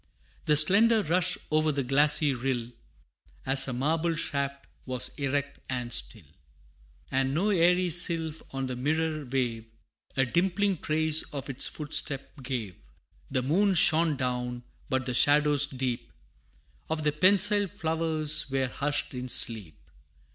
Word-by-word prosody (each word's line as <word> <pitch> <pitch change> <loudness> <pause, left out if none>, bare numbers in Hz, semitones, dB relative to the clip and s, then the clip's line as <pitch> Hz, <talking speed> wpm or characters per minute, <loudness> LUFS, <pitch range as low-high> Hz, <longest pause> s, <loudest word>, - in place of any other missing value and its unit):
The 150 -1 +3
slender 210 +8 +4
rush 180 +3 +2
o'er 155 0 +2
the 140 -1 -2
glassy 145 +2 +2
rill, 125 -2 -3 0.7
As 135 +1 +2
a - - -3
marble 160 +6 -1
shaft, 140 -2 -3 0.2
was 125 -1 -2
erect 140 0 -2
and 125 -2 -4
still, - - -1 0.9
And 135 +1 0
no 200 +6 +1
airy 180 0 +2
sylph 165 -1 +1
on 135 0 -4
the 130 -1 -5
mirror 155 +4 -2
wave, 120 -3 -3 0.5
A 135 - +3
dimpling 190 +5 0
trace 155 0 +2
of 140 -2 -6
its 130 - +1
footstep 145 -1 -1
gave. 120 -8 -5 0.5
The 130 -2 -1
moon 190 +8 +1
shone 160 -2 +4
down, 125 -1 -3 0.3
but 130 -1 -1
the 125 - -3
shadows 145 +2 +4
deep 130 -3 -4 0.8
Of 160 -1 -2
the 150 - +1
pensile 200 +5 +3
flowers, 160 -4 0
were 135 -1 -1
hushed 145 +2 -2
in 125 0 -6
sleep. 110 -10 +2
145 Hz, 135 wpm, -27 LUFS, 130-160 Hz, 0.9 s, slender